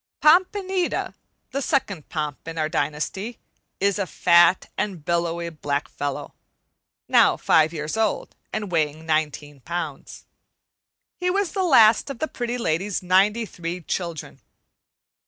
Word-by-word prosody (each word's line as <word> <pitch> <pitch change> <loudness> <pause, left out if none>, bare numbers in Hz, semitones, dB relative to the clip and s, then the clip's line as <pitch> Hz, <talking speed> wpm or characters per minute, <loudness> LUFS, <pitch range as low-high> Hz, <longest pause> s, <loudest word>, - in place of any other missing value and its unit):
"Pompanita," 370 +3 +2 0.4
the 275 - -2
second 200 - -1
Pomp 150 -2 -4
in 165 0 -6
our 155 -1 +1
dynasty, 170 +8 -3 0.4
is 200 +1 +1
a 195 - -1
fat 175 +2 +4
and 180 -8 -3
billowy 170 0 -1
black 145 -2 -2
fellow, 145 -1 -5 0.7
now - - +5
five 155 0 +3
years 150 +1 -4
old 220 -1 -1 0.2
and 210 -3 -4
weighing 155 -1 0
nineteen 150 -2 -1
pounds. 170 +6 -6 0.9
He 360 0 0
was 390 -1 0
the 390 - -1
last 230 -10 +5
of 275 - -5
the 315 - -2
Pretty 240 -3 -3
Lady's 190 -2 -1
ninety 200 +5 +3
three 175 -2 -5
children. 170 -2 -5
175 Hz, 130 wpm, -23 LUFS, 155-230 Hz, 0.9 s, now